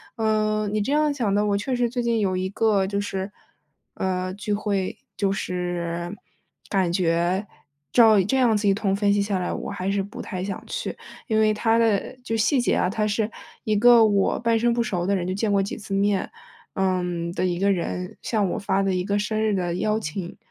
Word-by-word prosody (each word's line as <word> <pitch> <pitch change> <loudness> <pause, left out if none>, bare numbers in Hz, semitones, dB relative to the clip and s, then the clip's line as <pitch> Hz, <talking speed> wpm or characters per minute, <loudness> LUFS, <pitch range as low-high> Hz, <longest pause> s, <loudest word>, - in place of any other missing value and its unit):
嗯， 215 -2 0
你 215 - +1
这 270 - -2
样 300 -1 +2
想 220 -8 0
的， 210 - +2
我 205 -1 +1
确 255 +6 -2
实 245 -1 +1
最 245 +1 -2
近 235 -1 +1
有 190 -3 +1
一 185 +1 -2
个， 200 -2 +2
就 200 0 -1
是， 195 -1 -3 0.6
呃， 185 0 -2
聚 205 +1 -3
会， 205 -2 -1 0.2
就 195 -2 +1
是， 175 -1 -3 0.5
感 190 -4 +1
觉 175 +2 +1 0.5
照 220 -4 +6
这 265 +8 0
样 240 -4 +4
子 205 0 0
一 195 - +5
通 195 -1 0
分 200 0 +2
析 205 - +2
下 200 -1 -1
来， 180 - -2
我 - - -5
还 195 -1 -2
是 200 - +1
不 200 +2 -7
太 185 -2 -5
想 195 -1 -5
去。 - - -4 0.3
因 220 -3 +2
为 215 0 +4
它 225 +2 +2
的 225 -1 +1
就 225 -2 -2
细 220 +5 +2
节 - - +1
啊， 180 - +1
它 210 +2 -1
是 215 +1 0 0.3
一 215 - 0
个 235 +1 +7
我 200 -2 +2
半 230 -1 +2
生 235 +1 +2
不 235 - +1
熟 180 -6 -1
的 200 - +1
人， 180 -2 -2
就 185 - -1
见 205 +2 -1
过 200 -1 +3
几 195 - -3
次 195 -2 -7
面， 200 0 +1 0.5
嗯， 180 -3 -1
的 185 - -1
一 175 -1 -1
个 200 +1 +3
人 180 0 -3
向 210 -5 0
我 - - -2
发 195 -1 0
的 195 -1 +1
一 180 - 0
个 200 +1 0
生 215 +1 -1
日 220 -1 +1
的 175 -2 -1
邀 215 +3 0
请， 175 0 -5
200 Hz, 235 characters per minute, -24 LUFS, 185-220 Hz, 0.6 s, 个